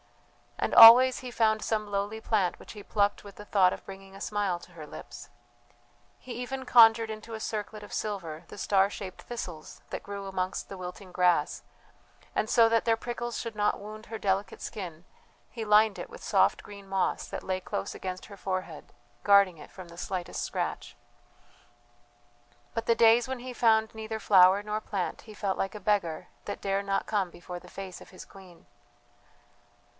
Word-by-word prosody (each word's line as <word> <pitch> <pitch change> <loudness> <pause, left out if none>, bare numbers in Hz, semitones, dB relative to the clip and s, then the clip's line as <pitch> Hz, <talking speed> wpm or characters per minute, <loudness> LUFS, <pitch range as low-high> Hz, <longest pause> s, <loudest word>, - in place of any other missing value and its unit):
And - - -1
always 245 +3 +10
he 255 - -7
found 220 -2 +2
some 215 -2 -2
lowly 205 +2 -2
plant 195 -7 0
which - - -11
he 210 - -9
plucked 205 0 0
with 200 -1 -12
the 210 - -11
thought 185 -3 +3
of - - -9
bringing 195 0 -11
a 195 - -11
smile 205 -4 -1
to - - -16
her 160 -3 -9
lips. - - -11 0.9
He 250 - -9
even 260 +2 -5
conjured 225 -2 +6
into 220 +1 -7
a - - -6
circlet 215 -1 -5
of 205 - -11
silver 175 -7 -4
the - - -11
star 195 -1 +2
shaped 190 -2 -8
thistles 175 -10 -7
that - - -5
grew 200 -1 -6
amongst 185 -1 -3
the 195 - -7
wilting 185 +1 -8
grass, 175 -4 +1 0.7
and 220 - 0
so 230 -2 +6
that 230 0 +2
their 225 -1 +3
prickles 240 0 -4
should 230 -2 -5
not 210 0 +1
wound 215 +2 -10
her 225 - -5
delicate 195 -1 -1
skin, 175 -5 -7 0.5
he 225 -2 -5
lined 210 0 +4
it - - -7
with - - -12
soft - - +2
green 200 -1 -12
moss 195 -1 -1
that - - -6
lay 185 0 -2
close 95 - -4
against 185 -1 -6
her 200 - -12
forehead, 185 -5 -5 0.3
guarding 200 -4 +5
it - - -12
from 185 -2 -11
the 170 0 -14
slightest 180 -2 -4
scratch. - - -4 1.8
But 230 0 -2
the 230 - +4
days 230 +1 +5
when 260 -1 -4
he 250 +1 -7
found 220 -2 +3
neither 220 0 -5
flower 195 -1 +5
nor 210 +1 -3
plant 195 -4 -3
he 215 -2 -13
felt 200 -2 -2
like 195 +2 -2
a - - -6
beggar 200 -6 0 0.2
that 205 - -5
dare 195 0 0
not 195 0 -1
come 200 -4 0
before 175 +1 -9
the - - -16
face 190 -2 -8
of - - -14
his 185 - -12
queen.... 185 -3 -16
205 Hz, 185 wpm, -28 LUFS, 185-220 Hz, 1.8 s, always